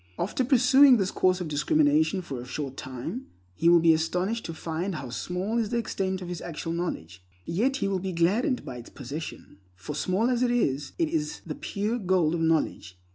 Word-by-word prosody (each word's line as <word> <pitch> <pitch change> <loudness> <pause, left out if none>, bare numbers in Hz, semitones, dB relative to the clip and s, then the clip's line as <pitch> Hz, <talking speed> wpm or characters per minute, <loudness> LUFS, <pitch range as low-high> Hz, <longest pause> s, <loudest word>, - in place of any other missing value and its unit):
After 205 +8 -1
pursuing 260 +1 +6
this 195 -2 0
course 185 0 +2
of 175 - -3
discrimination 290 - +2
for 135 -7 -6
a - - -9
short 135 0 -4
time, 130 - -6 0.3
he 165 - +3
will 170 0 +7
be 165 0 +5
astonished 180 +8 -1
to 165 - -5
find 170 +4 -3
how 130 -5 -6
small 185 - -2
is 220 -3 -1
the 235 - 0
extent 190 -4 -2
of - - -7
his 175 -1 -5
actual 165 -1 -5
knowledge; 90 - -4 0.2
yet 235 +11 +1
he 270 - -1
will 195 -1 0
be 190 +1 -3
gladdened 205 - +1
by 125 - -6
its 120 - -10
possession, 140 -5 -8 0.2
for 95 +11 -7
small 185 - +1
as 245 -1 0
it 250 - +3
is, 145 - 0
it 165 - +1
is 150 -1 -2
the 155 - -4
pure 210 +9 -2
gold 180 -5 +2
of 170 - -1
knowledge. 160 - 0
180 Hz, 205 wpm, -27 LUFS, 155-225 Hz, 0.3 s, will